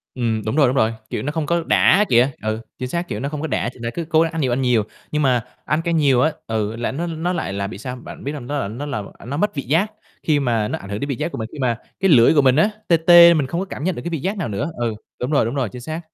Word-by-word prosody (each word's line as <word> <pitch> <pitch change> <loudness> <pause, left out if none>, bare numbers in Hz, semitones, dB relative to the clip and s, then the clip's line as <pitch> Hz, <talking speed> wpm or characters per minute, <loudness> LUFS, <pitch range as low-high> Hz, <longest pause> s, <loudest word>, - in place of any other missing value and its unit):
Ừm, 115 -3 -1
đúng 110 - -1
rồi, 150 -3 +5
đúng 125 - 0
rồi, 110 -3 +2 0.2
kiểu, - - -3
nó 145 - -2
không 160 -1 -2
có 170 +2 0
đã 210 +2 +4
kìa, 125 +3 +4
ừ, 110 +1 -2 0.2
chính 130 - -3
xác, 170 +5 -2
kiểu, 105 - -4
nó 140 +4 -3
không 150 -1 -5
có 160 - -2
đã 120 -2 -1
ch - - -15
nên 115 - -3
cứ 170 - -3
cố 160 -1 +4
gắng 165 0 +1
ăn 160 - -2
nhiều 130 -3 +1
ăn 130 - 0
nhiều. 125 -4 +2 0.3
Nhưng 150 - 0
mà 125 -5 +2 0.2
ăn 150 +4 0
cay 170 0 -1
nhiều 140 -6 +3
á, 155 +4 +3 0.2
ừ, 110 -1 -2
là 120 +1 -2
nó 165 +6 -3
nó 165 +2 -2
lại 155 - -3
là 100 0 -2
bị 105 - -8
sao, 125 +4 -6
bạn 125 - -10
biết 140 - -3
hông? 140 -5 -7
Nó 145 - -2
là 100 - -2
nó 120 +8 -6
làm 130 -9 -4
à, - - -14
nó 140 +4 -4
mất 210 0 0
vị 140 - -3
giác 165 - +1 0.3
khi 150 -2 +2
mà 115 -6 0
nó - - -3
ảnh 100 - -11
hưởng 100 0 -3
đến 140 - -4
vị 135 - -1
giác 170 - -3
của - - -6
mình, 110 - -4
khi 150 - -10
mà 120 -3 0 0.2
cái 195 - +2
lưỡi 120 -3 +6
của 150 - +5
mình 130 -2 +4
á 160 +8 +4 0.2
tê 170 - +5
tê 170 +1 +8
mình 150 -5 0
không 170 +6 -2
có 195 - -2
cảm 170 - -7
nhận 185 +1 0
được - - -6
cái 170 - -4
vị 165 - -2
giác 195 +8 -2
nào 175 - -2
nữa, 125 +10 -3
ừ, 120 -2 -1 0.3
đúng 125 +4 -2
rồi, 140 - +3
đúng 115 +4 -3
rồi, 130 -6 -1
chính 125 +2 -9
xác. 160 +5 -5
140 Hz, 340 wpm, -21 LUFS, 120-160 Hz, 0.3 s, tê